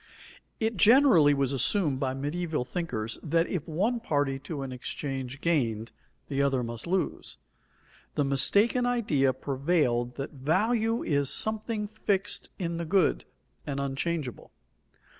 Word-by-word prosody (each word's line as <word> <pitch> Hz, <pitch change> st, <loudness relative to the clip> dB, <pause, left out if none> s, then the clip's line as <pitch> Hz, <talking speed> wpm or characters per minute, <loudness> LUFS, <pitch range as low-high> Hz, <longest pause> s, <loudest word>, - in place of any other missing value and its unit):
_ -, -, -28 dB, 0.6 s
It 220 Hz, -1 st, -1 dB
generally 205 Hz, -, +6 dB
was 140 Hz, -1 st, 0 dB
assumed 140 Hz, -, +1 dB
by 130 Hz, -1 st, -1 dB
medieval 150 Hz, 0 st, -2 dB
thinkers 125 Hz, -10 st, -4 dB
that 165 Hz, +1 st, +1 dB
if 180 Hz, -5 st, -4 dB
one 205 Hz, +10 st, 0 dB
party 145 Hz, -9 st, 0 dB
to 140 Hz, 0 st, -5 dB
an 135 Hz, -, -5 dB
exchange 135 Hz, +1 st, -5 dB
gained, 115 Hz, -9 st, 0 dB, 0.4 s
the 140 Hz, -1 st, -1 dB
other 135 Hz, -3 st, +1 dB
must 115 Hz, +5 st, -5 dB
lose. 185 Hz, +1 st, -2 dB, 0.8 s
The 145 Hz, -, +1 dB
mistaken 205 Hz, -, +3 dB
idea 160 Hz, -, +2 dB
prevailed 130 Hz, -2 st, 0 dB
that 135 Hz, +1 st, -5 dB
value 215 Hz, -, +1 dB
is 140 Hz, -2 st, +1 dB
something 215 Hz, +4 st, 0 dB
fixed 205 Hz, -2 st, -2 dB
in 170 Hz, -2 st, -3 dB
the 170 Hz, -, -3 dB
good, 185 Hz, 0 st, +2 dB, 0.4 s
and 140 Hz, -1 st, -2 dB
unchangeable. 140 Hz, 0 st, -3 dB
150 Hz, 135 wpm, -28 LUFS, 135-190 Hz, 0.8 s, generally